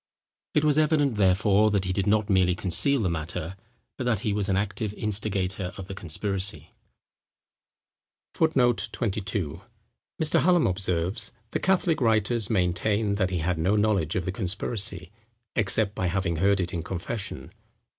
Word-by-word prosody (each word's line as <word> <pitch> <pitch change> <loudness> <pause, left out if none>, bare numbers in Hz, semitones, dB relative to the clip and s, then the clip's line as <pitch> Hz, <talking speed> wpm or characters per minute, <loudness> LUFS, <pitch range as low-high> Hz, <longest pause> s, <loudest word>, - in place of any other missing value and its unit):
It 150 - +3
was 150 0 +3
evident, 150 -5 +2
therefore, 100 +2 +4
that 100 -3 0
he 95 - -1
did 100 +2 -1
not 105 0 +2
merely 95 -3 +3
conceal 115 - +2
the 100 - +1
matter; 80 +2 -4 0.4
but 130 - -3
that 115 -5 +1
he 105 - -1
was 100 -1 -1
an 95 - +2
active 100 +1 -2
instigator 95 -3 -2
of 95 - -6
the 95 - -7
conspiracy. 95 +2 -4 1.6
[Footnote 125 -8 +2
22: 95 -7 -2 0.6
Mr. 155 -2 +3
Hallam 175 -1 +4
observes; 95 +2 0 0.2
"The - - -1
Catholic 175 -5 +1
writers 110 -1 +2
maintain 100 +2 +1
that 95 -2 0
he 90 - -2
had 90 -2 0
no 95 +6 +2
knowledge 105 -6 +1
of 95 - -1
the 95 - -1
conspiracy, 95 -1 -3 0.4
except 105 0 +1
by 90 - -1
having 90 -1 -1
heard 100 +3 +3
it 90 -1 -2
in 85 - -2
confession. 95 +5 -5
100 Hz, 155 wpm, -26 LUFS, 95-110 Hz, 1.6 s, therefore